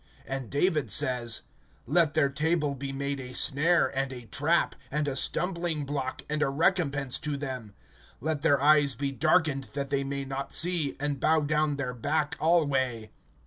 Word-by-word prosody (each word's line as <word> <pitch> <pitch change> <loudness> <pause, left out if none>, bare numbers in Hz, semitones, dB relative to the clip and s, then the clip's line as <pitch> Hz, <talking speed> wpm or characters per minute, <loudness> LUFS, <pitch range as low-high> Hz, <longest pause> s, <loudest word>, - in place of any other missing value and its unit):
(9)And 135 -3 -4
David 150 - +1
says: 120 -1 +2 0.4
Let 155 +2 +2
their 145 -3 +3
table 150 0 0
be 140 0 -5
made 140 +1 -3
a 125 -1 -8
snare, 160 +4 +2
and 135 0 -1
a 125 -2 -8
trap, 160 +8 +1 0.2
And 150 +1 -1
a 140 - -2
stumbling 170 0 -1
block, 135 -2 -4
and 150 0 -2
a 135 - +2
recompense 145 -4 0
to 150 -1 -3
them; 130 -7 -6 0.4
(10)Let 155 +2 -2
their 145 -3 +3
eyes 145 -2 +4
be 140 +2 -2
darkened, 140 +1 +1
that 140 -1 -3
they 140 -1 +1
may 140 0 -4
not 135 +1 -5
see, 170 -5 +2
And 145 -1 -2
bow 160 +3 +3
down 150 0 +1
their 130 -3 -3
back 145 +5 -1
alway. 135 -9 +1
140 Hz, 170 wpm, -28 LUFS, 135-155 Hz, 0.4 s, eyes